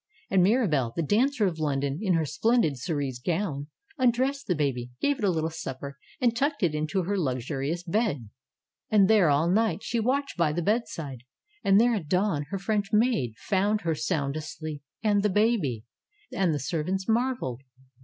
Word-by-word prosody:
And 190 - +4
Mirabelle, 175 - +2
the 165 - 0
dancer 235 - +2
of 170 -4 -1
London, 140 -1 -1
in 190 -5 +2
her 160 -1 +1
splendid 225 - +2
cerise 135 -2 -3
gown, 160 -1 -2 0.3
undressed 260 +3 +1
the 180 - +1
baby, 130 -5 -1
gave 285 -1 +1
it - - -5
a 200 - +4
little 160 -2 -1
supper 140 -3 -7 0.2
and 240 -3 +2
tucked 285 0 0
it 165 -4 +2
into 155 +5 -1
her 200 +4 -1
luxurious 140 +3 -2
bed! 170 - -1 0.6
And 205 -3 +5
there 205 -7 +5
all 145 +3 +3
night 210 +3 +1
she 235 - -1
watched 270 +4 0
by 165 -3 +2
the 175 +2 -1
bedside. 165 - -2 0.4
And 195 +1 +5
there 240 +1 +4
at 190 -9 -3
dawn 180 -4 +1
her 195 - -2
French 205 +1 -1
maid 215 - +2
found 205 +1 0
her 165 -1 0
sound 145 -3 -1
asleep, 155 -1 -6 0.2
and 205 -2 +3
the 210 - +2
baby! 190 - +1 0.5
And 185 -3 +1
the 150 - 0
servants 170 +7 -2
marveled. 230 - 0
180 Hz, 175 wpm, -27 LUFS, 145-215 Hz, 0.6 s, And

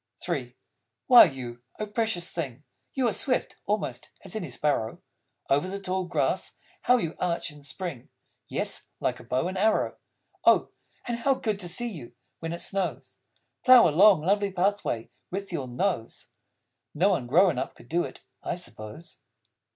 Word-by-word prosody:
III 130 -8 -3 0.5
Why 245 -2 +10
you, 125 -6 -6 0.2
O 215 - -2
Precious 210 -5 -1
Thing, 145 -5 -4 0.3
You 260 -3 +2
are - - +2
swift 255 +4 0
(almost) 210 0 -2 0.2
as 190 - -3
any 180 -8 -3
Sparrow. 125 -4 -1 0.5
Over 145 +6 +2
the 195 +1 -4
tall 190 -1 -2
grass 175 - -1 0.3
how 250 - +4
you 165 -8 -2
arch 170 -2 -1
and 145 -1 -14
spring, 145 -2 -6 0.4
Yes, - - -3
like - - -1
a - - -11
bow 130 +7 0
and 185 0 -3
arrow! 215 +2 +2 0.5
Oh, - - +4 0.4
and 240 -1 -2
how 270 +3 +3
good 215 -5 -2
to 180 -3 -2
see 240 +8 0
you, 145 - -9 0.3
when 165 0 -4
it 170 - -4
snows, 195 -2 -2 0.5
Plough 255 -2 +8
a - - +2
long, 190 +1 +6
lovely 200 +4 +1
pathway 185 - -1 0.2
with 195 +1 -5
your 140 -6 -2
nose! 125 - -2 0.7
(No 180 +7 +4
one 145 -11 0
grown 165 +1 +4
up - - -4
could - - -16
do 170 +4 +1
it, - - -8 0.2
I - - -2
suppose.) 115 -2 -9
175 Hz, 165 wpm, -27 LUFS, 140-200 Hz, 0.7 s, Why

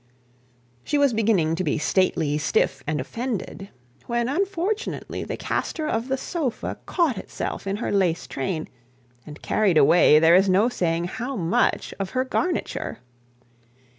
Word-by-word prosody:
She 295 - 0
was 285 -3 +3
beginning 205 -8 +2
to 185 - -1
be - - 0
stately, 160 -3 +1
stiff, 135 -2 0
and 155 0 -1
offended, 225 -5 -5 0.4
when 235 0 0
unfortunately 395 - -2
the - - -5
castor 310 -2 -2
of 225 -2 -1
the 265 0 0
sofa 275 -4 -3
caught 315 - +1
itself - - -5
in 195 - 0
her 220 - -3
lace 175 -8 +1
train, 135 +6 -3 0.6
and 150 0 -11
carried 200 -6 +2
away 150 +1 +6
there 160 +2 +6
is 190 +2 +5
no 200 +6 +4
saying 170 -8 -1
how 240 +9 -4
much 175 -4 0
of 195 -1 -2
her 255 - +2
garniture. 340 +6 -2
200 Hz, 145 wpm, -24 LUFS, 165-260 Hz, 0.6 s, away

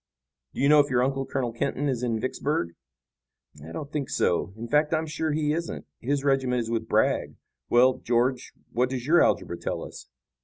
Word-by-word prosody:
"Do - - -3
you 140 - +4
know 150 +1 +7
if 145 0 +3
your 125 -1 +2
uncle, 135 0 -1
Colonel 125 -4 -2
Kenton, 140 +3 -1
is 130 -4 -1
in 115 -3 -1
Vicksburg?" 130 - -1 0.9
"I 80 - -9
don't 140 - -6
think 145 -4 -3
so. 90 +2 +1
In 115 +1 -6
fact, 150 +5 +2
I'm 160 0 -1
sure 160 0 -2
he 150 0 +1
isn't. 170 +1 -4
His 140 +3 -1
regiment 135 -3 +2
is 115 0 -4
with 115 -1 -2
Bragg. - - +1 0.3
Well, 125 +2 +4
George, 125 +2 0 0.2
what 125 +1 +1
does 130 -2 -4
your 170 +4 +5
algebra - - +1
tell - - -3
us?" - - -10
130 Hz, 195 wpm, -26 LUFS, 120-145 Hz, 0.9 s, know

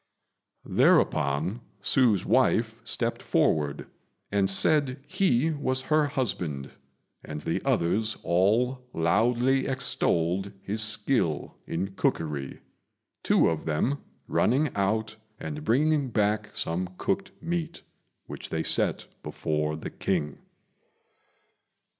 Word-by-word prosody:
Thereupon 80 - +2 0.2
Hsü's 115 -8 +3
wife - - +3
stepped - - -1
forward 75 -2 +1 0.5
and 100 -1 +2
said 130 +7 +3
he 160 -5 +2
was 130 -3 -1
her 155 -1 +4
husband, 90 - -2 0.5
and 75 -1 -6
the - - -2
others 105 +6 +1
all 115 +9 +2
loudly 120 +10 +2
extolled 95 -8 0
his 105 +2 -2
skill 105 - 0
in 95 +4 -3
cookery, 75 -7 -2 0.6
two - - +3
of 80 -2 -1
them 100 - 0 0.3
running 140 +6 +2
out 110 +3 0 0.2
and 150 0 -5
bringing 145 +2 +2
back 105 -1 0
some 90 +2 -3
cooked 190 -1 -1
meat, 170 0 -3 0.4
which - - -8
they - - -1
set - - +1 0.2
before 75 0 -2
the - - -7
King. 75 -1 -2
105 Hz, 105 wpm, -27 LUFS, 85-130 Hz, 0.6 s, her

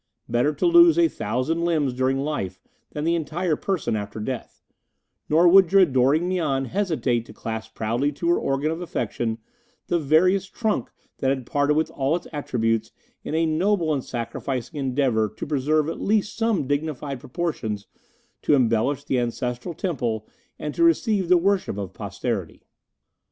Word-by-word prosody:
Better 125 +5 +2
to 150 - -2
lose 340 -1 +7
a 340 -1 +5
thousand 130 - -2
limbs 155 -6 +1
during 130 +1 +1
life 135 -11 -3 0.3
than 150 - -5
the 165 +2 +2
entire 165 +1 -1
person 185 - -1
after 105 0 -5
death; 125 +3 -6 0.7
nor 165 +3 +5
would 185 -1 +7
your 195 0 +7
adoring 140 +2 +2
Mian 155 -8 0
hesitate 155 - 0
to - - -11
clasp 110 0 -6
proudly 120 +6 0
to 170 +4 -4
her 175 - +3
organ 140 +3 0
of 165 +2 -4
affection 120 -9 -2 0.5
the 175 - +2
veriest 180 +6 +2
trunk 215 - -1 0.3
that 130 - +1
had 135 -2 -1
parted 145 +3 +1
with 160 - 0
all 140 +3 0
its 175 - -5
attributes 115 -6 -1 0.3
in - - -3
a 165 +1 +2
noble 165 +1 +1
and 135 -3 -2
sacrificing 125 +4 -4
endeavour 130 -5 +1
to - - -4
preserve 150 +1 +1
at 165 - -4
least 210 0 +1
some 225 -9 +1
dignified 145 -1 -2
proportions 120 -9 -3 0.6
to 150 - +3
embellish 125 +2 +1
the 130 - 0
Ancestral 125 +6 -3
Temple 120 - -2 0.3
and 150 - -4
to - - +1
receive 220 - +2
the 180 - +7
worship 190 - 0
of 95 -2 -5
posterity." - - -4
145 Hz, 160 wpm, -24 LUFS, 125-175 Hz, 0.7 s, lose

